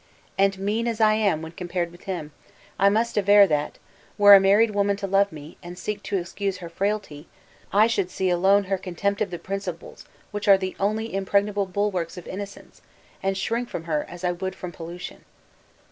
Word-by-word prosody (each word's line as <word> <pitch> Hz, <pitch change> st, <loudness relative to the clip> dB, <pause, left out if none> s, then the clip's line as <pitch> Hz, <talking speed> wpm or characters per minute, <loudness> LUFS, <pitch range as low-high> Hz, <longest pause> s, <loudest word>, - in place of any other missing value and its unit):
And 195 Hz, 0 st, +2 dB
mean 210 Hz, +4 st, -1 dB
as 230 Hz, -1 st, -2 dB
I 215 Hz, -1 st, +5 dB
am 200 Hz, -7 st, +1 dB
when 160 Hz, -, -7 dB
compared 175 Hz, 0 st, -3 dB
with 175 Hz, -, -17 dB
him, 175 Hz, -6 st, -5 dB, 0.5 s
I 200 Hz, +1 st, +6 dB
must 225 Hz, +2 st, +1 dB
aver 205 Hz, 0 st, +7 dB
that, 150 Hz, -5 st, -1 dB, 0.4 s
were 205 Hz, 0 st, +9 dB
a 200 Hz, -, +10 dB
married 205 Hz, +4 st, +4 dB
woman 200 Hz, 0 st, +1 dB
to 200 Hz, -, -5 dB
love 195 Hz, +1 st, +2 dB
me, 150 Hz, +1 st, -11 dB
and 175 Hz, 0 st, -9 dB
seek 205 Hz, +2 st, -4 dB
to 200 Hz, -, -2 dB
excuse 195 Hz, +2 st, -3 dB
her 175 Hz, -2 st, -8 dB
frailty, 190 Hz, -5 st, -3 dB, 0.4 s
I 210 Hz, +2 st, +5 dB
should 200 Hz, -5 st, 0 dB
see 185 Hz, 0 st, -1 dB
alone 195 Hz, +3 st, +4 dB
her 195 Hz, 0 st, -2 dB
contempt 195 Hz, +3 st, -2 dB
of 205 Hz, -, 0 dB
the 175 Hz, -, -5 dB
principles 185 Hz, -1 st, -6 dB, 0.2 s
which 205 Hz, 0 st, -4 dB
are 195 Hz, -1 st, +8 dB
the 190 Hz, -1 st, -4 dB
only 215 Hz, +2 st, -1 dB
impregnable 200 Hz, +1 st, 0 dB
bulwarks 185 Hz, -3 st, -2 dB
of 180 Hz, -, -9 dB
innocence, 200 Hz, +1 st, -8 dB, 0.4 s
and 195 Hz, 0 st, -1 dB
shrink 230 Hz, +5 st, -2 dB
from 165 Hz, -, -5 dB
her 155 Hz, -3 st, -1 dB
as 175 Hz, +1 st, -10 dB
I 180 Hz, -, +1 dB
would 185 Hz, +2 st, -4 dB
from 180 Hz, -, -7 dB
pollution." 170 Hz, +1 st, -9 dB
195 Hz, 195 wpm, -24 LUFS, 175-205 Hz, 0.5 s, a